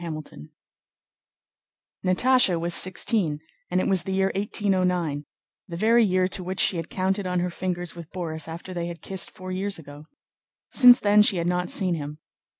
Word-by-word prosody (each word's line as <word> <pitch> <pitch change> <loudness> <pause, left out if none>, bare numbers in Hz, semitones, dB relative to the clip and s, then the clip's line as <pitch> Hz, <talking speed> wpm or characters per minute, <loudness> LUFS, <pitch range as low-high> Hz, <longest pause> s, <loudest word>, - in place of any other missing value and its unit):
CHAPTER 160 -2 -5 0.2
XII 75 - -12 1.5
Natásha 190 0 +3
was 170 +1 0
sixteen 185 -4 +2 0.3
and 180 - 0
it - - -1
was 190 -3 +3
the 190 - -4
year 190 0 +1
1809, 180 -7 -1 0.4
the 170 -2 -7
very 230 +4 +4
year 185 -2 +1
to 185 0 -2
which 185 +1 -5
she 180 - +2
had 165 0 -5
counted 190 +1 -2
on 180 0 -1
her 180 0 -2
fingers 175 -1 -4
with 170 -2 -10
Borís 160 -4 -4
after 170 +3 -8
they 170 -1 -4
had 170 -1 -9
kissed 190 -2 0
four 185 0 -9
years 195 +2 -2
ago. 145 -1 -12 0.7
Since 250 -2 +7
then 210 0 +5
she 210 -2 +3
had 170 - -2
not 180 0 -1
seen 185 -3 0
him. 150 -2 -6
180 Hz, 180 wpm, -24 LUFS, 170-195 Hz, 1.5 s, Since